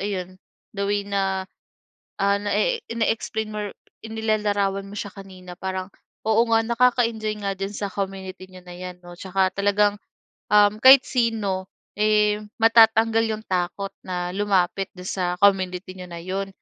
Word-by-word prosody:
ayun 185 -2 -4 0.4
the 200 - -1
way 205 0 0
na, 190 -1 -1 0.7
ah, 200 0 +3
na-e 470 - 0
na-explain 220 -1 -1
mo 210 - -4 0.4
inilalarawan 210 -3 0
mo 200 - -11
siya 205 - -4
kanina 185 -2 -11
parang 190 0 -4 0.4
oo 220 +1 +5
nga 225 - +5
nakakaenjoy 230 -3 +1
nga 195 - 0
diyan 195 +1 -4
sa 200 - -3
community 190 -1 -5
niyo 185 0 -12
na 180 0 -10
'yan 180 0 -7
'no, 175 0 -11
tsaka 190 0 0
talagang, 205 +1 +2 0.6
um, 210 0 +5
kahit 265 0 +9
sino, 215 -6 -1 0.3
eh, 210 0 +3 0.2
matatanggal 225 0 +5
yung 220 - -14
takot 185 +2 -2
na 180 -1 -3
lumapit 195 -1 0
dun 180 +1 -7
sa 180 -2 -1
community 185 -2 +2
niyo 180 - -7
na 170 0 -7
'yon. 195 +2 -3
200 Hz, 150 wpm, -23 LUFS, 185-215 Hz, 0.7 s, kahit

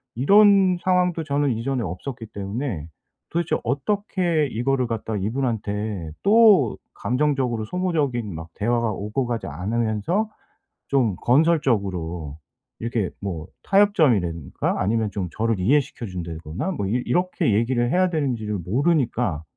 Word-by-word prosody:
이런 195 - +5
상황도 180 -2 +1
저는 145 -1 0
이전에 120 +3 -2
없었기 115 +7 -6
때문에 100 - -4 0.4
도대체 170 0 0
어떻게 170 - 0
이거를 125 +3 0
갖다 110 -1 -3
이분한테 105 - -2
또 205 - +5 0.2
감정적으로 125 -4 0
소모적인 145 - -1
막 80 0 -8
대화가 115 +1 0
오고 105 +6 -2
가지 120 -2 -3
않으면서 110 - -1 0.6
좀 125 -8 +2
건설적으로 100 - +1 0.4
이렇게 115 -4 -1
뭐 90 -4 -4 0.2
타협점이라든가 125 - +2
아니면 110 +1 0
좀 95 -3 -3
저를 115 -2 -1
이해시켜 135 +2 +1
준다거나 85 - -5
뭐 100 - -3
이 120 +5 0
이렇게 180 - +1
얘기를 120 +3 +1
해야 185 +1 +3
되는지를 120 - -1
모르니까 120 - 0
120 Hz, 315 characters per minute, -23 LUFS, 100-150 Hz, 0.6 s, 이런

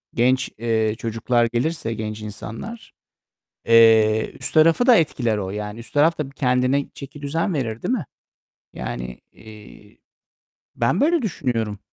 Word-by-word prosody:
genç, 130 +2 +2
eee, 110 -1 0
çocuklar 120 0 0
gelirse, 120 -1 -1
genç 110 -1 -5
insanlar, 110 - -8 0.8
eee, 110 -1 +5
üst - - -5
tarafı 165 +8 +4
da 250 - +8
etkiler 120 -8 0
o, 95 -2 -3
yani 105 +2 -5
üst 115 -1 -12
taraf 155 +3 +3
da 145 -3 -3
kendine 130 0 0
çekidüzen 145 +6 -4
verir, 115 -6 -3
değil - - -1
mi? 205 - -2 0.7
Yani, 60 0 -6
iii, 105 -1 -15 0.7
ben 120 +10 +1
böyle 330 +2 +3
düşünüyorum. 115 - -2
120 Hz, 130 wpm, -22 LUFS, 110-145 Hz, 0.8 s, da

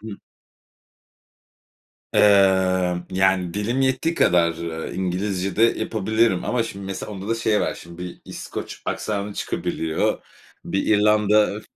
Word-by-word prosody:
Hımm. 110 -2 -8 1.9
Emm, 95 -3 +3
yani, 95 -2 +1
dilim 110 +6 -1
yettiği 135 +5 +1
kadar, 85 - +3
eee, 80 0 -5
İngilizce 95 +1 -2
de 115 - +3
yapabilirim 110 -4 +1
ama, 125 -2 0
şimdi, 100 -3 -7
mesela 100 +2 -5
onda 100 +2 -7
da 115 - +1
şey 110 -2 +1
var. - - -1
Şimdi, 85 0 -12
bir 90 - -8
İskoç - - -7
aksanı 100 -1 -3
çıkabiliyor. 80 -1 -2 0.4
Bir 95 - -2
İrlanda, 105 0 +3
ı 105 - -1
hı 110 - -8
100 Hz, 135 wpm, -22 LUFS, 90-105 Hz, 1.9 s, Emm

